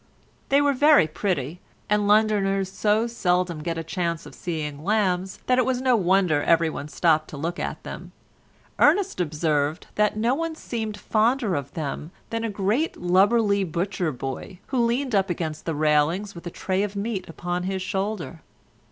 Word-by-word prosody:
They 280 +1 +5
were 285 -1 +3
very 290 - +6
pretty, 160 -2 -2 0.3
and 210 0 +2
Londoners 200 -3 +2
so 215 +3 +2
seldom 180 -7 0
get 165 +1 -3
a 165 - -3
chance 170 0 -2
of 145 - -11
seeing 150 -3 -5
lambs 190 -2 0
that 255 0 +3
it - - +4
was 260 -1 0
no 255 -1 +3
wonder 185 -6 +3
every 165 +1 +3
one 145 - -6
stopped 155 +1 +2
to 150 - -9
look 165 +5 -3
at - - -4
them. - - -8 0.7
Ernest 395 - +3
observed 155 -1 0
that 210 0 +1
no 230 +3 +2
one 325 +2 -2
seemed 220 -7 -4
fonder 225 -1 +1
of 140 -3 -3
them 155 -1 -4 0.2
than 230 0 -2
a 230 - -1
great 210 +10 0
lubberly 200 +3 +3
butcher 175 0 -2
boy, 135 +8 -6
who 265 - 0
leaned 240 +2 +1
up 195 -1 +2
against 160 -3 -3
the 165 - -1
railings 155 +7 +1
with 170 0 -9
a - - -2
tray 185 +2 -1
of 205 0 -2
meat 200 -2 -3
upon 175 +2 -3
his 190 0 -2
shoulder. 190 -4 -3
190 Hz, 175 wpm, -24 LUFS, 165-215 Hz, 0.7 s, very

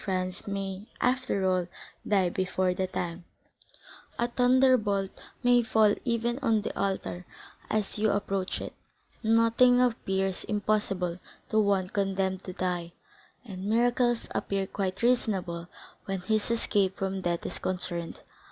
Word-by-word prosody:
Franz 185 -1 -2
may, 195 -1 -3 0.2
after 250 -6 +1
all, 185 -2 +1 0.4
die 195 -3 +3
before 185 0 0
that 185 0 -2
time, 170 0 -3 0.9
a 235 - +1
thunderbolt 245 -6 +3 0.3
may 245 0 +5
fall 220 -2 +4
even 235 +1 0
on 225 -6 +2
the - - -4
altar 190 -2 -2 0.5
as 215 -1 -1
you 215 0 +3
approach 195 -2 -1
it,—nothing 230 +2 +1
appears 195 -6 0
impossible 200 -4 0 0.3
to 220 - +4
one 200 -3 +2
condemned 190 -1 -1
to 185 - -6
die, 180 -2 -2 0.5
and 190 -4 -7
miracles 240 +2 +2
appear 195 -1 -1
quite 190 +1 -3
reasonable 190 -8 +1 0.4
when 195 -2 -3
his 215 +4 0
escape 205 -4 +1
from 195 0 -2
death 175 -1 -1
is - - -4
concerned. 175 -2 -3
195 Hz, 125 wpm, -28 LUFS, 185-230 Hz, 0.9 s, may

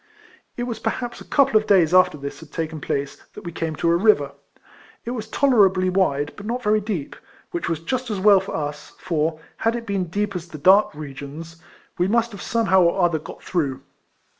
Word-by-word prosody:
' - - -31
It 240 - -2
was 240 -2 -4
perhaps 240 -1 -3
a - - -8
couple 275 -5 +3
of 215 - 0
days 180 -5 +4
after 185 -4 +5
this 140 0 -7
had 160 -2 -14
taken 160 -2 -4
place 140 0 -3 0.2
that 210 - -9
we 170 - -6
came 165 -1 -3
to 170 +2 +1
a - - +4
river. 170 -7 +3 0.7
It 235 - -3
was 220 -3 -5
tolerably 195 -9 +3
wide, 145 -6 +1
but 205 0 -9
not 245 +2 -3
very 215 0 +2
deep, 195 -9 -4 0.4
which 170 -1 -3
was 165 -2 -1
just 255 +8 -3
as 205 -3 -2
well 200 0 +6
for 190 - -6
us; 150 -1 -5
for, 155 -1 -1 0.2
had 225 +1 0
it 235 -1 -5
been 200 -3 -1
deep 200 +3 -2
as 175 -1 -5
the 160 - -9
dark 190 +3 +4
regions, 150 +3 -8 0.4
we 180 - +3
must 230 +2 +1
have 200 -3 -9
somehow 215 -5 +2
or 175 +2 +2
other 165 -2 +1
got - - -11
through. 145 -8 -2
185 Hz, 215 wpm, -22 LUFS, 160-215 Hz, 0.7 s, well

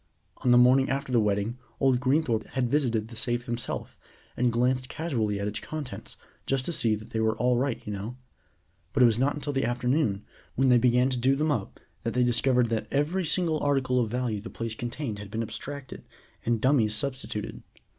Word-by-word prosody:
On 125 - -1
the 120 - +7
morning 130 +2 +5
after 135 0 -2
the 120 - +4
wedding 105 +3 0 0.2
old 130 -2 +3
Greenthorpe 130 -4 +1
had 125 -2 0
visited 120 -7 +1
the 115 - -10
safe 120 +1 -1
himself, 120 -1 -4 0.4
and 125 0 +2
glanced 125 +2 +1
casually 115 -11 -1
at 100 - -2
its 105 +1 -3
contents, 150 +2 -7 0.3
just 135 -1 0
to - - -2
see 115 -7 +1
that 110 +1 -10
they 110 - -1
were 110 0 +1
all 125 +2 +2
right, 130 0 -1
you 105 - -4
know; 105 +5 -5 0.8
but 135 -3 +4
it - - +9
was 115 -1 +3
not 140 +3 +2
until 145 0 -3
the 135 - 0
afternoon, 125 -3 0 0.3
when 135 +1 +3
they 125 -1 +6
began 125 +1 +3
to 125 - 0
do 135 +3 +3
them 150 +2 +1
up, 110 -9 -3 0.2
that 115 - -3
they 125 - +3
discovered 125 0 +3
that 110 -2 -1
every 155 +7 0
single 165 -1 +1
article 135 -3 +1
of 115 -3 0
value 120 -3 -2
the 110 - -8
place 115 -1 -4
contained 120 -1 -4
had 100 -1 -8
been 115 +2 -2
abstracted, 140 +4 -6 0.4
and 115 -2 +1
dummies 120 -5 +3
substituted. 130 -5 -3
125 Hz, 205 wpm, -27 LUFS, 115-135 Hz, 0.8 s, it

